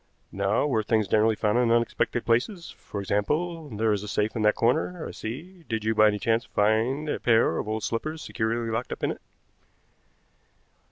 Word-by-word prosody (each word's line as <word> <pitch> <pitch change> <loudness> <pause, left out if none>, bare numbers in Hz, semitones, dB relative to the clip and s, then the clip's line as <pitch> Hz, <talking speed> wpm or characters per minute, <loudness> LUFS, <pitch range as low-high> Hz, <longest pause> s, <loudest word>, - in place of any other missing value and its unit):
Now 100 +6 +1
were 130 -7 +1
things 110 -1 +1
generally 110 +3 +3
found 105 +3 +1
in 120 -2 +2
unexpected 115 0 +1
places? 165 - 0
For 100 - -7
example, 150 - -1
there 110 -1 +1
is 100 - -1
a 105 - -7
safe 105 +2 -1
in 115 - -1
that 105 0 +4
corner, 160 +8 0
I - - -6
see; 170 +11 -8
did 115 -2 -2
you 110 +1 +1
by 110 0 +6
any 105 -1 +1
chance 115 +3 +1
find 115 +8 +1
a - - -2
pair 115 -8 +3
of - - -4
old 110 0 -2
slippers 155 +9 -3
securely 115 +1 -2
locked 115 +3 -3
up - - -6
in - - +1
it?" - - -8
115 Hz, 190 wpm, -26 LUFS, 105-125 Hz, -, by